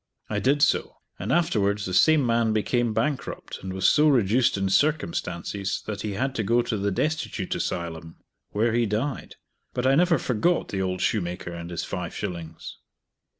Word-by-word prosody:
I - - 0
did 140 +2 +2
so, 145 - +1 0.2
and - - -3
afterwards 105 -11 +1
the 95 - -4
same 150 - +5
man 115 -2 +2
became 120 +2 +1
bankrupt, 120 +6 -3
and 95 - -5
was 95 0 +1
so 150 +1 +5
reduced 120 -3 +3
in 95 0 0
circumstances 100 - 0
that 105 -1 -4
he 105 -1 -3
had 130 +7 -1
to 110 - 0
go 120 +4 +2
to 115 - -2
the 100 0 0
Destitute 115 -3 -2
Asylum, 80 -1 -4 0.3
where 110 +2 +1
he 120 -1 +2
died; 120 +7 -3 0.4
but 125 - -1
I 135 - +5
never 170 +2 +4
forgot 135 +8 0
the 95 - -2
old 90 -1 -2
shoemaker 90 -3 -1
and 85 0 -7
his 85 - -3
five - - -5
shillings. 85 -2 -6
110 Hz, 175 wpm, -25 LUFS, 95-130 Hz, 0.4 s, same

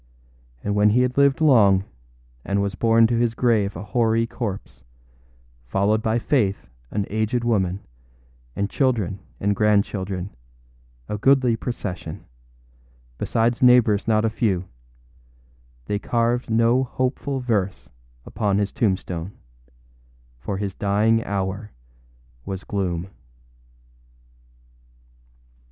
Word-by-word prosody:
And 105 - -1
when 105 +1 +4
he 120 +4 +3
had 125 0 0
lived 140 +1 +3
long, 105 -10 +5 0.6
and 100 +1 -1
was 100 0 -1
borne 115 +4 +4
to 115 0 +1
his 120 -1 +1
grave 110 -5 +1
a 85 - -6
hoary 115 0 +1
corpse, 110 -4 -6 0.8
followed 100 - +1
by 110 +1 0
Faith, 110 - 0 0.2
an 100 -1 -2
aged 110 +3 0
woman, 100 -5 0 0.7
and 100 - -1
children 110 -7 0 0.2
and 100 +1 +1
grandchildren, 100 -2 0 0.8
a 105 - -4
goodly 130 0 +4
procession, 100 -7 -6 0.9
besides 115 +1 0
neighbors 120 -5 +5
not 110 0 +2
a - - +2
few, 95 -5 0 1.2
they 100 +6 -2
carved 120 +3 0
no 115 +3 +3
hopeful 130 +2 -2
verse 105 -6 -2 0.4
upon 100 -2 -1
his 100 -1 0
tombstone, 95 -3 -2 1.1
for 95 +10 -4
his 100 -1 -3
dying 105 +4 +1
hour 100 +1 -3 0.7
was 95 +4 -6
gloom. 90 -3 -2
105 Hz, 110 wpm, -23 LUFS, 100-120 Hz, 1.2 s, long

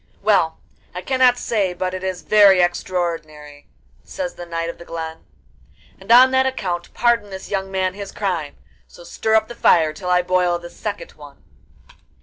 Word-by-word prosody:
'Well, 190 -6 +2 0.4
I 180 - -5
cannot 255 -2 +3
say 200 -7 -1
but 185 +1 -3
it 185 0 -6
is 185 -1 -4
very 200 -3 +6
extraordinary,' 165 -5 -3 0.4
says 275 -2 -5
the 175 - -10
Knight 165 0 -3
of 170 - -7
the - - -10
Glen, 160 -1 -7 0.7
'and 195 +4 -5
on 255 +2 +8
that 260 0 +3
account 180 -9 -4
pardon 235 -4 +1
this 190 -1 -9
young 195 -1 -2
man 190 -1 -1
his 200 0 -8
crime; 175 -8 -3 0.3
so 175 - -15
stir 220 +5 -1
up 220 0 +3
the - - -8
fire, 160 -8 +3
till 180 +3 -6
I 180 0 +3
boil 180 -1 +1
this 175 0 -12
second 205 -2 -6
one. 145 -2 -15
185 Hz, 175 wpm, -20 LUFS, 170-210 Hz, 0.7 s, on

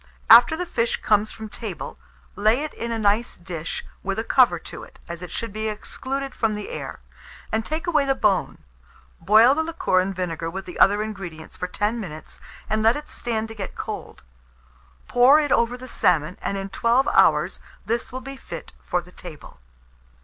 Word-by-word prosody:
After 240 +7 +9
the 360 - -2
fish 230 -8 0
comes 210 0 +3
from 220 -1 -8
table, 210 -6 -7 0.4
lay 220 +7 +3
it 305 - -5
in 235 +1 -4
a 230 - -1
nice 215 +2 +1
dish 170 -3 -5 0.2
with 195 +1 -3
a 220 - -1
cover 240 -7 +4
to - - -9
it, - - -15
as 170 0 -7
it 180 - -7
should 230 -3 -5
be 215 0 -2
excluded 270 +5 -5
from 220 -1 0
the 210 -1 -6
air, - - -6 0.5
and 220 0 0
take 315 +7 -3
away 305 -5 +2
the 270 0 +2
bone; 200 -7 +1 0.6
boil 220 +5 +6
the 315 - 0
liquor 320 - +1
and 190 +1 -1
vinegar 165 -2 -3
with 190 +3 -6
the 180 - -9
other 205 +2 +5
ingredients 185 -7 -8
for 180 - -4
10 210 +5 -1
minutes, 155 -7 -8 0.3
and 215 +1 0
let 225 +2 +4
it 295 0 -7
stand 225 -2 -2
to - - -7
get 200 -3 -6
cold; - - -7 0.8
pour 255 +5 +6
it 295 -2 -1
over 235 +1 +2
the 255 +1 -10
salmon, 170 -6 +1
and 200 - -2
in 195 0 -4
12 235 +6 +2
hours - - +3 0.3
this 235 +3 -2
will 260 +1 -5
be 270 +1 -8
fit - - -9
for 180 - -1
the 180 - -17
table. 170 -5 -11
220 Hz, 195 wpm, -23 LUFS, 190-245 Hz, 0.8 s, After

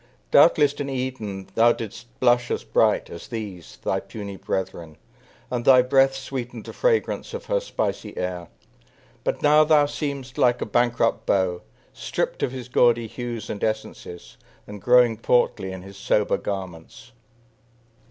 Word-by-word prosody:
Doubtless 145 -1 +6
in 145 -1 -5
Eden 125 -7 -4
thou 120 +1 +5
didst 115 +2 -8
blush 120 0 +3
as - - -2
bright - - +1
As 85 - -9
these, 105 -7 -7
thy 95 - 0
puny 100 0 -8
brethren; 90 -5 -4 0.5
and 120 -1 -2
thy 130 -1 +7
breath 135 +1 +3
Sweetened 125 -4 -6
the - - -8
fragrance 480 -3 0
of - - -7
her - - +1
spicy - - -4
air; 90 -2 -4 0.8
But - - -2
now 150 +1 +6
thou 155 -1 +4
seemest 140 -3 -5
like 120 0 +3
a - - -2
bankrupt 120 -1 +1
beau, 90 -2 +1 0.3
Stripped - - -3
of - - 0
his 130 -2 -7
gaudy 120 -2 +3
hues 120 -1 -6
and 100 - -5
essences, 110 -5 -5 0.3
And 105 -1 -10
growing 120 -1 +4
portly 110 -4 +1
in 95 -1 -8
his 100 0 -12
sober 105 +1 +1
garments. 95 -9 -7
120 Hz, 150 wpm, -24 LUFS, 100-130 Hz, 0.8 s, thy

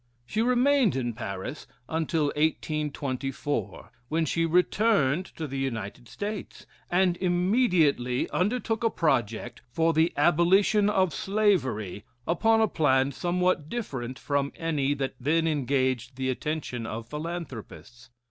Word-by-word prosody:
She 215 - -1
remained 250 - +3
in 120 -3 -1
Paris 110 +4 -6 0.2
until 160 -2 0
1824, 145 - -2 0.2
when 160 +1 +1
she 165 +2 0
returned 180 -2 +2
to 160 - -4
the 135 -2 -4
United 120 -3 -4
States, 205 - -6 0.2
and 180 0 +2
immediately 175 - +2
undertook 225 +3 0
a 230 - +4
project 120 - -1
for 165 +6 +1
the 160 +2 +3
abolition 185 +7 +4
of 190 -5 +2
slavery 140 - 0 0.2
upon 225 +6 +3
a 220 - +4
plan 135 -6 +2
somewhat 175 0 0
different 130 - -4
from 140 -1 -1
any 145 -4 0
that 135 -1 -2
then 160 +6 +1
engaged 130 -4 0
the 130 0 -1
attention 130 -4 -4
of 115 0 -5
philanthropists. 150 -6 -7
155 Hz, 120 wpm, -27 LUFS, 130-180 Hz, 0.2 s, a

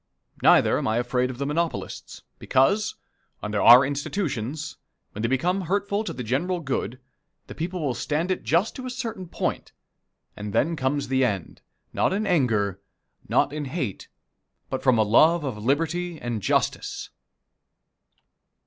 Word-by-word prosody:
Neither - - +5
am - - -2
I 110 +1 +1
afraid 125 +1 0
of 130 - -6
the 140 - -2
monopolists, 160 +3 -3 0.2
because, 200 +12 +2 0.5
under 105 -1 -1
our 125 +3 +9
institutions, 145 - -3 0.3
when 105 - -6
they 115 - +1
become 175 +10 +1
hurtful 200 +3 -1
to - - -4
the 125 - -5
general 165 +11 -1
good, 130 -5 -3 0.5
the - - -9
people 175 +2 -4
will 130 - 0
stand 155 +8 -1
it 185 - -1
just 170 +8 +1
to 255 -1 -6
a - - -3
certain 230 -7 -5
point, - - -3 0.6
and 105 -1 -6
then 165 +1 +2
comes 140 0 -1
the 130 +1 +2
end 100 -8 -2 0.3
not - - +1
in 210 +2 -1
anger, 110 - +1 0.5
not 145 - +2
in 150 -1 -3
hate, 130 - -4 0.6
but 130 - -2
from 130 -3 +4
a 110 - +4
love 155 +10 +4
of 110 -7 -4
liberty 165 +5 0
and 120 -3 -3
justice. - - -1
145 Hz, 155 wpm, -25 LUFS, 120-175 Hz, 0.6 s, our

